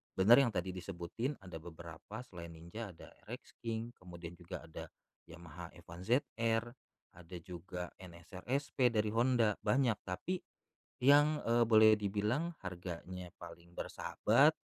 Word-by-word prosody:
Bener 110 +7 +8
yang 125 -5 +4
tadi 90 +1 -1
disebutin, 95 - -3
ada 90 -4 -7
beberapa, 85 +6 -8
selain 85 -6 -9
Ninja 85 +7 -7
ada - - -13 0.2
RX - - -8
King, 115 0 -2
kemudian 85 -2 -9
juga 85 - -7
ada 80 - -7 0.4
Yamaha 85 0 -9
F1ZR, 115 - +1 0.5
ada 85 +1 -10
juga 90 0 -6
NSRSP 95 - -1
dari 105 -2 +1
Honda, 115 -2 +3
banyak. 125 -5 +2
Tapi 175 - -2 0.6
yang, 145 +3 +6
eee, 120 +1 +4
boleh 110 -1 +7
dibilang 105 - 0
harganya 90 -1 -6
paling 85 0 -11
bersahabat, - - +3
95 Hz, 125 wpm, -35 LUFS, 85-115 Hz, 0.6 s, Bener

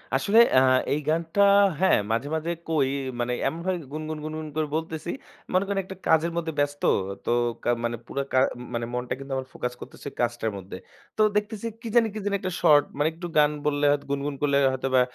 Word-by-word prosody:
আসলে 215 +3 +4
অ্যা 130 - +6 0.3
এই 145 - 0
গানটা 165 +4 +1 0.4
হ্যাঁ 190 - +4
মাঝে, 115 +5 0
মাঝে 160 +2 -2 0.2
কই, 145 -5 +2 0.3
মানে 120 +1 0
এমনভাবে 175 +3 -2 0.2
গুনগুন, 155 0 -4
গুনগুন 155 0 -5
করে 155 -1 0
বলতেছি। 160 +1 -3 0.4
মনে 185 +1 +3
করেন 200 0 0
একটা 190 +1 -9
কাজের 160 +1 +3
মধ্যে 165 -1 -2
ব্যস্ত। 145 0 0 0.4
তো - - 0 0.3
কা - - 0
মানে 120 0 -1
পুরো 140 - -2
কা 130 - +5 0.3
মানে 120 0 -1
ম - - -10
মনটা 125 0 -2
কিন্তু 135 0 -9
আমার 130 0 -3
ফোকাস 125 0 -3
করতেছে - - -10
কাজটার 120 -2 -1
মধ্যে। 95 -1 -8 0.4
তো - - +2 0.2
দেখতেছি 210 +1 -3 0.2
কি 235 - -6
জানি 235 -2 +5
কি 215 - -4
জানি 205 -1 +1
একটা 185 -1 -3
শর্ট, 145 -1 +6
মানে 145 +1 +2
একটু 175 +2 -7
গান 150 0 +5
বললে 145 0 +1
হয়তো 145 0 0
গুনগুন 140 +1 -2
করলে 140 -1 +2
হয়তো 130 0 -2
বা 130 - +6
155 Hz, 200 wpm, -26 LUFS, 135-170 Hz, 0.4 s, অ্যা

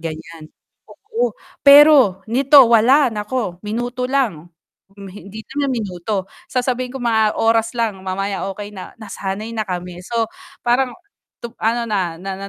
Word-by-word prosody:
ganyan. 160 0 -8 0.4
Oo. 450 +4 -3 0.3
Pero, 280 -9 +7
nito 275 +4 +4
wala 250 +4 +5
nako 210 -3 -3
minuto 245 +4 -3
lang, 225 - -1 0.5
hindi 200 +2 -10
naman 280 0 -2
minuto, 195 -2 -3 0.3
sasabihin 250 0 -1
ko - - -7
mga 220 -2 +2
oras 225 0 +1
lang 220 -5 -1
mamaya 195 +1 -3
okey 205 +1 -9
na, 190 -3 -9
nasanay 210 +1 -5
na 215 - -1
kami 180 -1 -5
so 230 +3 -1 0.4
parang 250 +1 +1 0.7
ano 230 +2 +1
na, 185 -6 -1
na 195 +1 -6
na 195 0 -7
220 Hz, 135 wpm, -19 LUFS, 190-250 Hz, 0.7 s, Pero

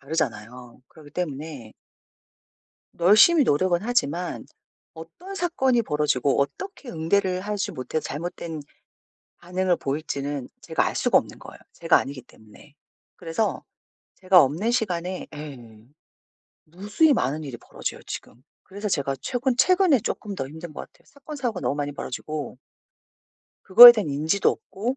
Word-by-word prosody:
다르잖아요. 125 -5 -5
그러기 150 -2 -16
때문에 145 -8 -6 1.3
열심히 215 - +6
노력은 175 - +1
하지만 180 -7 -2 0.5
어떤 170 - -11
사건이 265 -10 +1
벌어지고 145 - 0
어떻게 245 - -5
응대를 185 +3 0
하지 205 0 -3
못해 130 +5 -4
잘못된 160 +1 -6 0.8
반응을 180 +1 -1
보일지는 140 -2 -4
제가 - - 0
알 - - -3
수가 - - +3
없는 - - -7
거예요, - - -12
제가 - - +3
아니기 135 -1 -6
때문에. 115 +5 -19 0.4
그래서 175 +5 -3 0.5
제가 185 -2 +5
없는 160 - 0
시간에 185 -6 -2
예. 120 -7 -11 0.8
무수히 205 - +1
많은 150 - -1
일이 130 -4 -7
벌어져요, - - -7
지금. 120 - -9 0.2
그래서 205 +2 -6
제가 140 -6 -1
최근 250 0 -1
최근에 360 - +4
쪼끔 205 0 -4
더 135 - -4
힘든 160 +3 -10
것 - - -6
같아요. - - -18
사건 290 +2 -11
사고가 240 -8 -3
너무 - - -1
많이 145 0 -3
벌어지고 145 +1 -6 1.0
그거에 240 +6 +11
대한 215 -8 -3
인지도 155 +7 +1
없고 235 +7 -5
170 Hz, 320 characters per minute, -24 LUFS, 145-210 Hz, 1.3 s, 그거에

